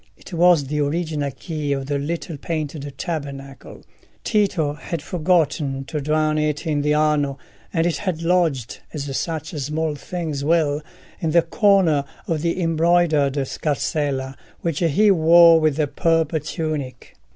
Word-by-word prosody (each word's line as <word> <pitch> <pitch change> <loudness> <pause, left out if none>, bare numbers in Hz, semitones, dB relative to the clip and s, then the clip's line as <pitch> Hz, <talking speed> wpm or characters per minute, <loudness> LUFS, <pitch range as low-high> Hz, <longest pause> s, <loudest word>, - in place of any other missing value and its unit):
It - - -13
was 170 -2 +5
the 150 +2 -2
original 150 -1 -1
key 145 +1 -4
of 135 -1 -3
the 140 0 -1
little 165 +2 -4
painted 145 -1 -4
tabernacle: 140 -5 -6 0.4
Tito 190 -9 +1
had 165 +2 -5
forgotten 155 -4 0
to 150 +1 -4
drown 155 +1 +1
it 150 +1 -1
in 150 -3 0
the 150 +1 +1
Arno, 150 -2 +1 0.3
and 165 0 +1
it 175 - 0
had 175 -5 -3
lodged, 165 -9 0 0.2
as 140 -2 -4
such 160 -1 -3
small 150 +2 -2
things 155 -2 -4
will, 150 -2 +2 0.4
in 165 - -1
the 170 +1 +4
corner 180 -5 +3 0.2
of 160 -3 -1
the 170 +2 -1
embroidered 165 -3 +2
scarsella 140 -3 -2 0.3
which 165 -4 -2
he 185 +5 +3
wore 170 -1 +7
with 155 -3 +2
the 155 0 +1
purple 165 +1 +1
tunic. 150 -3 -5
155 Hz, 145 wpm, -22 LUFS, 145-170 Hz, 0.4 s, wore